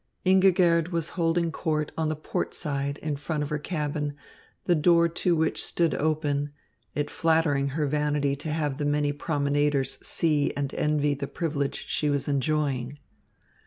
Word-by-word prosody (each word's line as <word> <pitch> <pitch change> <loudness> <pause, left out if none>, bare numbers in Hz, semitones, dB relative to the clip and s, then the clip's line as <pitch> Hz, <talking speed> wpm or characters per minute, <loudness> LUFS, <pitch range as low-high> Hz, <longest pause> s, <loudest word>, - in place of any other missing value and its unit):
Ingigerd 180 -3 +4
was 170 -2 -2
holding 165 -1 +1
court 155 -2 -1
on 160 -1 0
the 155 - -1
port 155 - -3
side 140 -2 -2
in 150 -2 -2
front 150 +1 -2
of 145 - -4
her 150 - -1
cabin, 150 -2 -2 0.5
the 175 - +4
door 170 +1 +4
to 170 +1 0
which 160 0 0
stood 165 -3 +1
open, 145 -2 0 0.5
it 145 0 -1
flattering 160 -4 +2
her 150 - +1
vanity 145 -1 +1
to 150 +3 -6
have 150 -3 -1
the 145 - -1
many 145 0 +1
promenaders 145 -2 0
see 150 -3 +1
and 140 -1 -2
envy 150 -1 +1
the 140 0 -4
privilege 145 -4 -2
she 150 - 0
was 140 -1 -1
enjoying. 140 -2 0
150 Hz, 160 wpm, -27 LUFS, 145-160 Hz, 0.5 s, Ingigerd